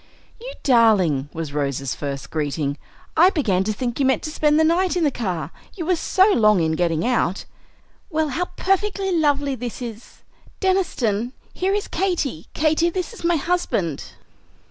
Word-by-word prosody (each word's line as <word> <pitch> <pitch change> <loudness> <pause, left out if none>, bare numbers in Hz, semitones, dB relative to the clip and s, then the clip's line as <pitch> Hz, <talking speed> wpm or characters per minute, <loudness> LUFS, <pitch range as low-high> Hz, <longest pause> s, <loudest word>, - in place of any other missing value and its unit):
"You - - -7
darling!" 200 - +3
was 160 -3 -5
Rose's 140 -2 -2
first 140 -2 -5
greeting. 145 -2 -2 0.4
"I 350 +4 +7
began 215 - +1
to 215 - 0
think 240 +3 -3
you 275 - +3
meant 265 - +1
to 310 - -4
spend 300 0 +2
the - - +5
night 355 +3 +2
in 345 - +1
the 295 - +3
car, 175 - -3 0.2
you 345 -5 -4
were 365 +2 +2
so 380 +4 +3
long 210 -3 +4
in 160 -1 +1
getting 165 +2 0
out. 235 -7 0 0.6
Well, 315 -3 0
how 335 +7 -1
perfectly 390 0 0
lovely 290 -3 +1
this 245 -2 -5
is! 235 -2 -9 0.4
Deniston, 255 - 0 0.2
here 385 +2 0
is 415 - -2
Katy; 330 - -2
Katy, 315 +2 +2
this 365 +5 -4
is 455 - -11
my 345 0 +3
husband." 280 - -1
265 Hz, 165 wpm, -22 LUFS, -, 0.6 s, I